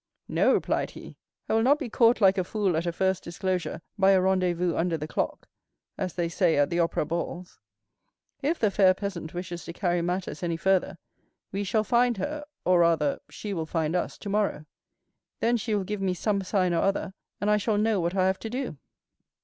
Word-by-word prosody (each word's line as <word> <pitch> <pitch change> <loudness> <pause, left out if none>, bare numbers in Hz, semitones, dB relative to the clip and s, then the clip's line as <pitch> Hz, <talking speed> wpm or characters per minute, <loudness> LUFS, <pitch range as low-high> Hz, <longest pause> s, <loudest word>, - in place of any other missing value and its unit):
"No," - - +3
replied - - +1
he; - - -11 0.3
"I - - -1
will 225 - +4
not 270 +5 +4
be 290 -4 -4
caught 230 0 +3
like 195 -1 +5
a - - +1
fool 195 -2 0
at 165 +2 -1
a - - +1
first 190 +2 0
disclosure 175 -1 -3 0.2
by 195 0 +6
a 190 - +5
rendezvous 180 -2 +1
under 170 -1 0
the 150 0 -5
clock, - - -3 0.5
as 185 -2 -4
they 175 -1 0
say 170 -1 +2
at 145 0 +2
the 170 - 0
opera 165 -2 +1
balls. 170 +2 -5 0.8
If 310 +4 0
the 215 -3 +2
fair 190 -2 +5
peasant 185 -5 -5
wishes 175 -1 -5
to 170 - -7
carry 175 -1 0
matters 180 -2 -3
any 170 -2 -1
further, 190 0 +1 0.5
we 200 +1 -2
shall 215 +2 +1
find 240 0 +2
her, 295 +10 -3 0.2
or 180 -1 +4
rather, 165 -4 +2
she 205 -2 -6
will 160 -3 -3
find 160 0 -1
us 180 - -2
tomorrow; 200 -6 -1 0.7
then 235 +1 +2
she 220 -1 -1
will 200 - 0
give 210 +1 -4
me 185 -2 0
some 200 +2 0
sign 185 -2 +1
or 165 - +2
other, 195 0 0 0.3
and 210 +1 +1
I 210 - +5
shall 210 +1 0
know 215 -1 +2
what 170 +2 -1
I 185 -1 +3
have 190 0 +1
to 225 - -5
do." 250 - -4
185 Hz, 205 wpm, -27 LUFS, 170-210 Hz, 0.8 s, by